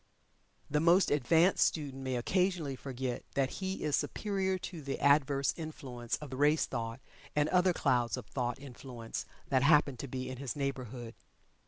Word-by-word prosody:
The 150 - +1
most 170 +4 +5
advanced 160 +6 +4
student 140 -4 -1
may 130 -1 -2
occasionally 175 +2 0
forget 130 -1 -4
that 135 -1 +1
he 190 0 -3
is 150 -2 +2
superior 190 -2 -1
to 180 -2 -7
the 135 -1 -4
adverse 140 -2 +3
influence 130 -7 -4
of 150 -3 -9
the 130 - -5
race 150 +2 +4
thought, 115 -1 -4 0.4
and 150 0 +3
other 180 0 +4
clouds 125 -8 +1
of - - -7
thought 120 +2 -2
influence 125 -3 -7 0.2
that 130 -2 +3
happen 145 -2 +4
to 140 - -5
be 130 0 -4
in 130 0 -5
his 135 +2 -4
neighborhood. 130 -4 -4
140 Hz, 165 wpm, -32 LUFS, 125-155 Hz, 0.4 s, most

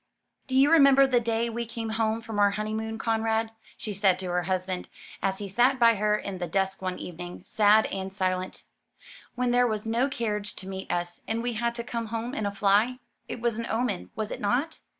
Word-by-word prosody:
"Do 260 - -2
you 275 +3 +5
remember 275 -4 +7
the 255 -2 +3
day 230 0 0
we 235 0 -4
came 230 -1 -5
home 220 0 0
from 225 -2 -4
our 205 0 +6
honeymoon, 215 +2 -3
Conrad," 225 0 0 0.3
she 210 - -5
said 195 -2 +3
to 185 -1 -4
her 180 0 +1
husband, 185 0 -2 0.3
as 190 0 0
he 205 - -5
sat 245 +7 +3
by 235 -2 +6
her 210 0 +1
in 195 -3 -6
the 175 - -2
dusk 190 +3 -1
one 185 -1 -3
evening, 175 +1 -8
sad 210 +1 +4
and 190 0 -4
silent, 185 -1 -2 0.7
"when 250 0 0
there 245 0 +4
was 215 -2 -3
no 235 +5 +1
carriage 210 -5 -3
to 190 - -9
meet 190 0 -5
us, 175 0 -3
and 225 +1 -1
we 245 0 -1
had 235 +1 -1
to 235 - -4
come 235 -1 -4
home 230 +3 -4
in 215 -8 -1
a - - -2
fly? 205 +5 +2 0.3
It 240 - -6
was 235 -2 0
an 230 - -3
omen, 220 - -1
was 215 -1 -3
it - - -5
not?" 255 +10 0
220 Hz, 215 wpm, -27 LUFS, 195-235 Hz, 0.7 s, remember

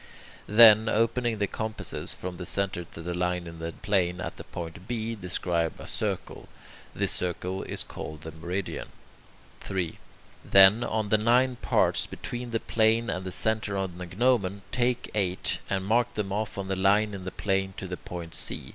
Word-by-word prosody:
Then, 110 0 +8
opening 115 +1 +1
the 100 - +1
compasses 110 +2 -4
from 90 -1 -6
that 90 - -6
centre 100 -3 -1
to 85 0 -10
the 90 +1 -3
line 90 0 -1
in 85 -1 -9
the 80 0 -4
plane 90 -1 0
at - - -4
the - - -9
point 85 +2 -8
B, 115 -1 -2
describe 90 -4 -1
a - - -8
circle. - - -4 0.5
This - - +1
circle 90 +1 0
is - - -4
called 80 -1 -8
the 80 - -6
meridian. 90 +5 -4 0.7
3. 90 -4 -3 0.4
Then, 100 +4 +7
of 110 -3 -1
the 110 - +5
nine 125 +3 +3
parts - - +2
between 120 0 -6
the 115 -1 0
plane 115 +1 +2
and 95 - -3
the - - -4
centre 110 0 0
on 95 -2 -3
the 90 - -5
gnomon, 100 -1 +1
take 125 -1 0
eight, 95 -3 0
and 95 -1 -1
mark 120 +3 +2
them 100 -2 -2
off 105 0 -3
on 100 -1 -3
the 95 - -1
line 100 +3 +3
in 95 -2 -6
the 95 - -3
plane 95 -1 -1
to 95 - -5
the 90 0 -5
point 85 -2 -8
C. - - -4
95 Hz, 180 wpm, -27 LUFS, 90-110 Hz, 0.7 s, Then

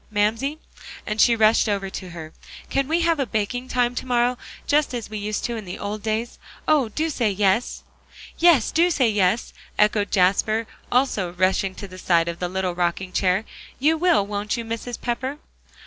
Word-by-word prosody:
Mamsie," 220 +8 0 0.5
and 215 0 0
she 235 - +5
rushed 220 0 +4
over 200 -1 -1
to 185 -1 -7
her, 160 -2 -9 0.4
"can 275 -1 +1
we 330 +3 +1
have 335 -2 +2
a 275 - +1
baking 225 +4 -2
time 245 -1 +1
to 250 - -4
morrow, 245 0 +2 0.3
just 290 -3 +2
as 230 -3 -6
we 215 - -4
used 210 +1 -3
to 235 - -2
in 220 - -5
the 180 -2 -7
old 205 +1 -4
days? 225 +2 -3 0.3
Oh! 290 -7 +3
do 310 +9 -1
say 245 -8 0
yes." 200 +3 0 0.6
"Yes, 330 -9 +5
do 340 +2 +3
say 260 -9 +2
yes," 205 +2 +1 0.2
echoed 210 -1 +2
Jasper, 205 +4 +2 0.3
also 215 -9 +1
rushing 185 +1 +1
to 200 - -7
the 185 0 -11
side 170 -2 +2
of 170 0 -4
the 180 - -2
little 185 -1 -2
rocking 175 +1 -1
chair. 185 +3 +1 0.3
"You 305 +5 +3
will, 335 - +3
won't 205 +2 -2
you, 230 - -4
Mrs. 230 +1 -5
Pepper?" 255 +3 -2
"Hoh! - - -24
215 Hz, 195 wpm, -23 LUFS, 195-250 Hz, 0.6 s, she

